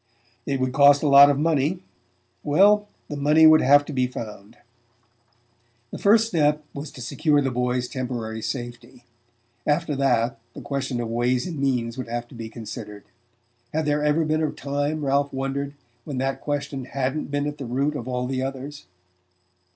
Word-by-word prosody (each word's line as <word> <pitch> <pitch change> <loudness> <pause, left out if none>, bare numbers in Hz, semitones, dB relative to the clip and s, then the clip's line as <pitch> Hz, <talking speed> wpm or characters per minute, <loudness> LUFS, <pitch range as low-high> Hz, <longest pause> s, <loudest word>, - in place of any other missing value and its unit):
It 135 -2 -1
would 130 -1 -1
cost 140 +1 +6
a - - +2
lot 140 0 +8
of 140 - +1
money 160 +3 0 0.6
well, 205 +7 +4 0.2
the 150 - -5
money 150 +3 +4
would 155 0 +7
have 145 +2 +5
to 150 - -7
be 130 -1 +1
found. 110 -3 -9 1.3
The - - -7
first 220 +2 +4
step 150 -6 +1
was 145 +2 -6
to 125 -5 -8
secure 145 +3 +1
the 135 -2 0
boy's 125 0 -1
temporary 120 -5 -4
safety; 120 0 -6 0.6
after 150 0 +1
that, 120 -4 +1 0.2
the - - -8
question 135 -3 -3
of 120 - -2
ways 120 +2 0
and 170 -5 -5
means 125 -3 -1
would 130 - -5
have 120 0 -4
to - - -15
be 115 -2 -7
considered...Had 120 +4 -9
there 150 0 0
ever 150 +2 +2
been 155 +1 0
a 155 - +1
time, 145 +2 -3
Ralph 140 +1 +1
wondered, 135 +1 -3 0.3
when 140 -1 -6
that 135 +1 -2
question 140 -2 -3
hadn't 135 +3 -3
been 145 0 -1
at 145 0 -5
the 135 - -5
root 140 +5 -1
of 125 -4 -5
all 125 -1 -2
the 130 0 -2
others? 135 -1 -6
135 Hz, 175 wpm, -24 LUFS, 125-150 Hz, 1.3 s, lot